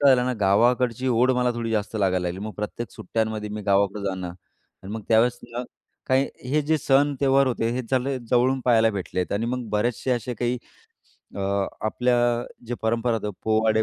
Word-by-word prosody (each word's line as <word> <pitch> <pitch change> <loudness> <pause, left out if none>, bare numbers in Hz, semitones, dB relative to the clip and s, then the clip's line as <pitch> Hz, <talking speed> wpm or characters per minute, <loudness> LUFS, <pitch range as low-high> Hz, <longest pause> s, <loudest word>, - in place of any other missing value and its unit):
काय 140 -1 +6
झालं 125 0 +1
ना, 125 - +1
गावाकडची 120 +5 +3
ओढ 125 +1 +3
मला 125 0 +2
थोडी 115 -1 -3
जास्त 110 0 -1
लागायला 95 -3 +1
लागली. 90 +2 -5
मग 110 - -6
प्रत्येक 105 +2 -4
सुट्ट्यांमध्ये 110 +1 -3
मी 105 0 -5
गावाकडं 100 0 +1
जाणं 95 -2 -3
आणि 95 +3 -14
मग 110 - -4
त्यावेळेस 115 +2 +4
ना 120 +1 -3 0.4
काही 130 +1 +2 0.2
हे 150 +2 +3
जे 160 - +3
सण 140 +2 +3
त्योहार 135 0 +4
होते 115 -2 0
हे 130 +1 -2
चांगले 130 +1 0
जवळून 130 +2 +3
पहायला 115 -2 +4
भेटलेत 90 -2 -3
आणि 105 +3 0
मग 125 -1 -3
बरेचसे 120 +4 0
असे 120 0 -1
काही 120 +2 -1 0.8
अ, - - -3 0.5
आपल्या 125 +3 +1 0.5
जे 120 - -2
परंपरा 115 +1 +1
होत्या 105 -2 -2
पोवाडे 110 0 +3
115 Hz, 180 wpm, -24 LUFS, 105-125 Hz, 0.8 s, काय